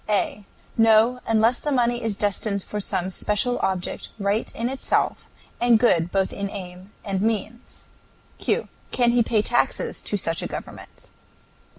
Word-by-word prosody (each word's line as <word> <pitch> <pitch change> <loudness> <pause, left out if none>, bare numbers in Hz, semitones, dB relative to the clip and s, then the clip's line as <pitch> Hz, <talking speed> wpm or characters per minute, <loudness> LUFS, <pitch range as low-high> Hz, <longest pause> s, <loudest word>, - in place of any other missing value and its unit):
A. 205 0 0 0.3
No, 225 +2 +5
unless 225 +2 +3
the 295 - -2
money 240 -2 +1
is 215 -3 -1
destined 200 -1 0
for 210 - -5
some 190 -2 0
special 210 +6 0
object, 185 -2 -2
right 200 +1 0
in 230 - -1
itself, 265 +1 -1 0.3
and 240 -1 +6
good 175 -8 +3
both 195 -1 0
in 200 0 -3
aim 185 -1 -8
and 195 -2 -1
means. 225 +2 -3 0.5
Q. - - 0 0.2
Can 240 -1 +3
he 240 0 +3
pay 220 -2 +2
taxes 240 - 0
to 205 - -2
such 165 -3 -1
a - - -3
government? - - -9
215 Hz, 155 wpm, -24 LUFS, 195-235 Hz, 0.5 s, and